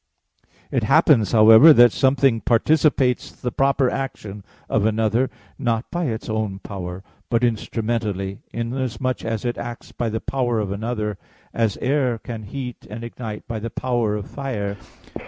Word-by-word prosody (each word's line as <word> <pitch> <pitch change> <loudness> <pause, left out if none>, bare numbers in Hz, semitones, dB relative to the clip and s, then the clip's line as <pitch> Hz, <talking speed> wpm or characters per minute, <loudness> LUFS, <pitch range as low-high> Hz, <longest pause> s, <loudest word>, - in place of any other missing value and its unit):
It - - +1
happens, 105 -5 +4
however, 115 +8 +8
that 120 -3 +7
something 130 -3 +2
participates 130 0 +2
the 125 - -5
proper 135 +1 +2
action 105 -7 -5 0.2
of 110 - +1
another, 110 +3 +1 0.3
not 115 -3 -1
by 175 0 -1
its 120 0 -3
own 110 -3 -2
power, 95 -2 -7 0.3
but 115 +1 +1
instrumentally, 110 -4 -2
inasmuch 125 +1 -3
as 115 0 -3
it 120 - -2
acts 120 0 -7
by 120 - -2
the 110 +1 -2
power 120 -2 -1
of 100 -3 -2
another; 105 -1 -3 0.3
as 115 -4 0
air 130 -3 +1
can 115 -1 -7
heat 125 +3 -7
and 110 +3 -7
ignite 115 -2 -7
by 115 -2 -4
the 115 +2 -4
power 120 -3 -1
of 105 -2 -5
fire. 110 -8 -4
115 Hz, 150 wpm, -22 LUFS, 110-125 Hz, 0.3 s, however